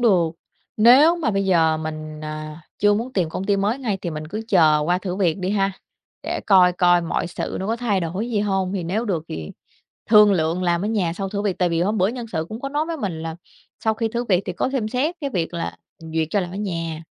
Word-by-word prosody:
được. 185 -9 +3 0.5
Nếu 265 +10 +7
mà 305 -10 0
bây 195 -1 0
giờ 165 -4 +3
mình, 155 -1 -6
à, 155 +1 -6 0.2
chưa 205 0 +4
muốn 240 +4 -3
tìm 180 -5 0
công 185 +4 -4
ty 200 0 +2
mới 205 +6 0
ngay 220 -8 -2
thì 170 - -3
mình 155 0 -6
cứ 215 +6 -4
chờ 160 -7 +5
qua 175 +2 +1
thử 185 -1 -4
việc 185 -3 +1
đi 185 0 -2
ha, 195 -1 +1 0.5
để - - -3
coi 185 -3 +6
coi 175 0 +4
mọi 170 +1 -2
sự 175 - -4
nó 190 - -3
có 225 +2 0
thay 225 -5 0
đổi 185 +8 -3
gì 210 - +1
hông, 195 -2 0
thì 190 -3 -2
nếu 205 +7 -1
được 180 -8 -1
thì 80 -1 -6 0.6
thương 210 -2 +7
lượng 165 +1 0
làm 175 0 +1
ở - - 0
nhà 195 -7 0
sau 195 +2 -4
thử 200 0 -2
việc, 200 -3 -1
tại 180 -1 +2
vì 165 0 0
hôm 210 +4 0
bữa 185 +1 +3
nhân 240 +1 -4
sự 160 -2 -2
cũng 220 +3 -7
có 275 - -3
nói 295 +2 -1
với 330 -1 -4
mình 180 - -4
là 165 0 -4 0.5
sau 220 0 +2
khi 225 +1 -1
thử 235 +2 -2
việc 190 -4 +1
thì 185 - -3
có 215 - -1
xem 240 -6 -1
xét 270 +9 -1
cái 280 - -2
việc 175 -8 -2
là 170 - -4 0.2
duyệt 160 -1 -2
cho 205 - +1
làm 180 -2 -3
ở 190 - -7
nhà. 165 -5 -4
190 Hz, 260 wpm, -22 LUFS, 165-215 Hz, 0.6 s, Nếu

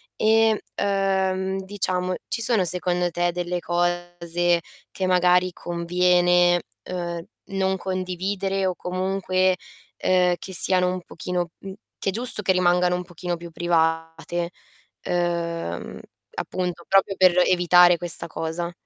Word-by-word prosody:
Ehm, 220 0 +3 0.2
uhm, 190 -1 0
diciamo 185 -2 -1
ci 230 - -1
sono, 225 -4 +3
secondo 180 0 -1
te, 175 +1 0
delle 175 0 -2
cose 175 0 0 0.3
che 190 - -3
magari 180 0 +3
conviene, 175 0 +2 0.3
uhm, 175 -2 -4 0.3
non 190 0 0
condividere 190 +1 -2
o 185 -1 0
comunque, 185 0 0 0.4
ehm, 180 -1 +2
che 190 - -8
siano 180 +1 +4
un 185 - -5
pochino 175 0 -4
mhmm, 195 -1 -8 0.3
che - - -1
è - - 0
giusto 235 -1 -3
che 190 -1 +2
rimangano 180 0 +3
un 180 - -3
pochino 175 0 -5
più 170 0 -10
private, 165 +1 -1 0.5
ehm, 170 - -2 0.4
appunto 180 -2 -4
proprio 195 0 +3
per 185 -2 +6
evitare 175 -1 +5
questa 175 0 0
cosa? 165 +2 -4
180 Hz, 125 wpm, -23 LUFS, 175-190 Hz, 0.5 s, per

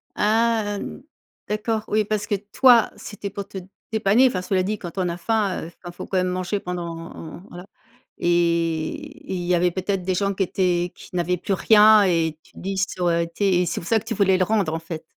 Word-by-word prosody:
Ah 215 -1 +1 0.7
d'accord, 215 +1 -1
oui, 215 0 +1
parce 210 0 -2
que 205 - +1
toi, 230 +4 +4
c'était 205 -1 -7
pour 200 0 -6
te 200 - -9 0.3
dépanner. 220 +4 +4
Enfin, 185 -7 -1
cela 185 0 0
dit, 210 +2 -2
quand 175 0 -9
on 180 -2 0
a 170 - -4
faim, 205 -1 0
heu, - - -7 0.2
enfin 175 - -7
il - - -10
faut - - -7
quand 190 - -1
même 185 0 +2
manger 185 +2 -2
pendant 170 -2 -7
voilà, 175 +1 -10 0.5
et 170 -2 +1 0.4
et - - -3
il 175 - -3
y 180 0 +2
avait 175 +1 +2
peut-être 185 +1 -2
des 185 0 -1
gens 200 +1 0
qui 190 - 0
étaient 175 -1 0
qui 180 - -13
n'avaient 180 +1 0
plus 195 - -2
rien 215 +1 +6
et 165 -4 +1
tu - - -24
te - - -21
dis: 195 +1 -4
«Ça 190 -1 -2
aurait 170 -1 +2
été» 180 +2 +1
et 180 - +1
c'est - - -3
pour 165 - -9
ça 225 -1 +3
que 215 - -16
tu 225 - -3
voulais 195 -2 +3
le 185 - +2
rendre 200 -5 +1
en 165 - -2
fait? 165 -1 -7
185 Hz, 230 wpm, -23 LUFS, 175-210 Hz, 0.7 s, rien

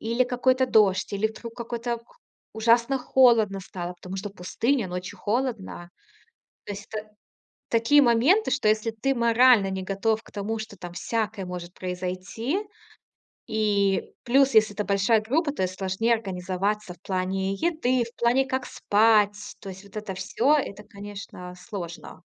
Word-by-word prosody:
или 235 +3 +1
какой-то 255 +1 +2
дождь, 205 -6 +3
или 205 +2 +1
вдруг 230 +1 -9
какой-то 235 0 -4
к 230 - -23 0.5
ужасно 235 +4 +3
холодно 235 -6 +4
стало, 180 -1 -6
потому 185 +2 -8
что 200 +2 -4
пустыня, 210 +5 -1
ночью 180 +1 -6
холодно. 220 -6 -2 0.8
То - - -5
есть 200 0 -8
это 215 0 -5 0.6
такие 235 +6 +5
моменты, 275 - +4
что 280 -6 +1
если 215 +1 +1
ты 245 +5 -1
морально 235 -3 +5
не 190 0 -3
готов 210 +3 0
к - - -17
тому, 220 +2 -3
что 220 -2 -8
там 175 0 -8
всякое 215 +1 -2
может 180 -1 -7
произойти 185 - -3 0.9
И, 205 -3 +1
плюс, 270 +1 +3
если 215 -1 +5
это 210 +1 -2
большая 205 +3 +3
группа, 290 +8 0
то 290 - -5
и 185 - +2
сложнее 190 +5 0
организоваться 195 0 -3
в - - -33
плане 190 +1 -1
еды, 255 - +1
в 235 +1 -11
плане, 245 +3 +3
как 260 -1 -2
спать. 210 -2 +3 0.2
То 195 - -8
есть 190 +1 -9
вот 200 - -17
это 210 -3 -5
всё, 260 +9 +2
это, 210 -8 -2
конечно, 200 -3 -9
сложно. 180 -3 -8
215 Hz, 155 wpm, -25 LUFS, 195-235 Hz, 0.9 s, такие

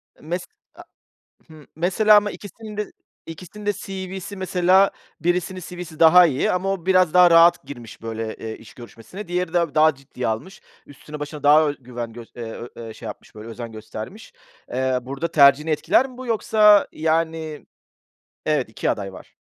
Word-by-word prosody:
Eee, - - -24
mes 175 +3 -4 0.3
a - - -12 0.6
Hı, 155 -2 -15
mesela 190 +6 +4
ama 205 0 +1
ikisinin 210 +1 -10
de 210 -1 -4 0.3
ikisinin 180 +5 -10
de 205 - +1
CV'si 190 +1 -7
mesela 185 +1 +3 0.3
birisinin 180 +2 -1
CV'si 175 -2 -9
daha 175 +2 +8
iyi 140 -5 0
ama 190 +2 -1
o 180 -3 -7
biraz 185 -3 +3
daha 180 -1 +7
rahat 165 +1 +6
girmiş 120 -5 -11
böyle, 115 -1 -5
ııı, 110 0 -5
iş 110 - -15
görüşmesine. 120 - -11
Diğeri 180 -1 -2
de 170 -4 0
daha 155 -1 +5
ciddiye 135 -2 -6
almış. 115 - -5 0.2
Üstüne 150 +1 -11
başına 145 0 -7
daha 150 +1 +5
ö 145 - -4
güven 120 -2 -7
gös 115 0 -11
eee, 120 - -6
ö 115 +1 -7
eee 115 -1 -8
şey - - -12
yapmış - - -10
böyle 110 +1 -10
özen 115 0 -7
göstermiş. 110 - -9 0.4
Eee, 130 0 0
burada 135 +6 -5
tercihini 145 +1 +5
etkiler 245 - +2
mi 250 - -15
bu 260 - -8
yoksa, 215 -2 +4
yani 160 -1 -2 0.8
Evet, - - 0
2 - - -2
aday 95 -1 -3
var. - - -14
160 Hz, 175 wpm, -22 LUFS, 130-185 Hz, 0.8 s, daha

